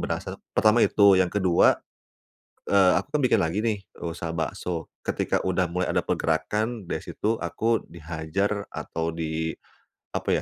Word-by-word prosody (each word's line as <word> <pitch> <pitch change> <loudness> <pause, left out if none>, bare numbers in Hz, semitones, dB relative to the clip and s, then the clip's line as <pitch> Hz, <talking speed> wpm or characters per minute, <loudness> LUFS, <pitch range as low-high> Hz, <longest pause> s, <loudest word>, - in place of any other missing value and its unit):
berasa. - - -3 0.2
Pertama 110 +2 +5
itu, 100 -4 +5
yang 90 - +3
kedua, 95 -3 +4 0.9
eee, 95 -2 +5
aku 95 - -7
kan 150 - +2
bikin 125 - +4
lagi 85 +2 0
nih 110 -2 +1 0.3
usaha 85 -1 -4
bakso. 80 +1 -3
Ketika - - -1
udah 90 -2 +1
mulai 90 +1 -1
ada - - +1
pergerakan 105 +8 -1
dari - - -1
situ 110 +1 -1
aku 115 0 -1
dihajar 85 +5 -3
atau 80 0 -4
di, 80 0 -2 0.6
apa - - -4
90 Hz, 145 wpm, -26 LUFS, 80-105 Hz, 0.9 s, Pertama